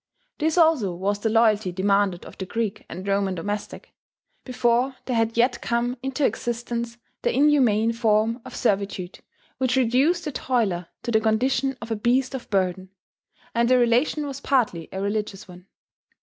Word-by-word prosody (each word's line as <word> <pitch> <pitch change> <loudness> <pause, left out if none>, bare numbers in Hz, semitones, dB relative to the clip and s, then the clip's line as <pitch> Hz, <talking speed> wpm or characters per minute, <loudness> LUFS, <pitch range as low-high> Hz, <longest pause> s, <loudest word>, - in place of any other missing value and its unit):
This 315 +2 0
also 310 - +3
was 200 +3 -1
the 220 - 0
loyalty 220 -4 +3
demanded 195 0 +1
of - - -11
the 190 - -3
Greek 220 -1 -3
and 185 +2 -7
Roman 195 -1 +1
domestic, 205 +4 -5 0.5
before 250 +1 +1
there 250 - -2
had 225 0 0
yet 240 0 +2
come 240 +1 -1
into 270 +2 -1
existence 235 -1 -3 0.2
that - - 0
inhuman 250 -6 +3
form 225 +1 +1
of - - -10
servitude 195 -4 -1 0.4
which 260 -1 +1
reduced 265 +8 +2
the 300 - -2
toiler 210 -11 -1 0.2
to 240 - -2
the 220 -1 +3
condition 255 +4 +1
of 230 - -8
a - - +1
beast 245 +5 +1
of 260 -3 -6
burden; 185 -1 -1 0.6
and 235 +1 +2
the 255 - +5
relation 250 +5 +2
was 280 -1 -6
partly 220 - 0
a 190 - -5
religious 200 -1 -3
one. 180 0 -14
230 Hz, 165 wpm, -24 LUFS, 200-255 Hz, 0.6 s, the